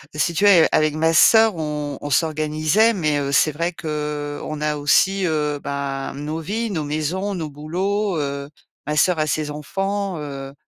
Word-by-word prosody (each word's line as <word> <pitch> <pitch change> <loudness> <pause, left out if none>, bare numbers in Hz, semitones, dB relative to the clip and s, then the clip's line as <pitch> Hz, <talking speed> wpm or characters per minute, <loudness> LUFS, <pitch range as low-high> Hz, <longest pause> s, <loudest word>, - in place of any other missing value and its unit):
si 170 +3 0
tu 200 +5 +1
veux, 180 -5 +7
a - - +4
avec 155 0 +2
ma 160 +1 +2
sœur, 220 +4 +6
on 150 -2 -4
on 145 - -5
s'organisait. 155 +8 +2
Mais, 155 -6 0
heu, 140 0 -2
c'est 155 +2 +3
vrai 170 +4 -2
qu'on 150 -1 -4
a 150 0 0
aussi, 190 +6 +2
heu, 150 -2 -1
ben, 140 -1 -4
nos 150 +3 -4
vies, 215 +7 -3
nos 160 -5 -2
maisons, 170 +7 -2
nos 160 -3 -4
boulots, 185 +6 -2
heu. 140 0 -4 0.4
Ma 150 - -1
sœur 180 -1 +3
a 155 - +1
ses 150 0 -1
enfants, 195 +5 -3
heu. 140 -2 -7
155 Hz, 180 wpm, -21 LUFS, 145-180 Hz, 0.4 s, veux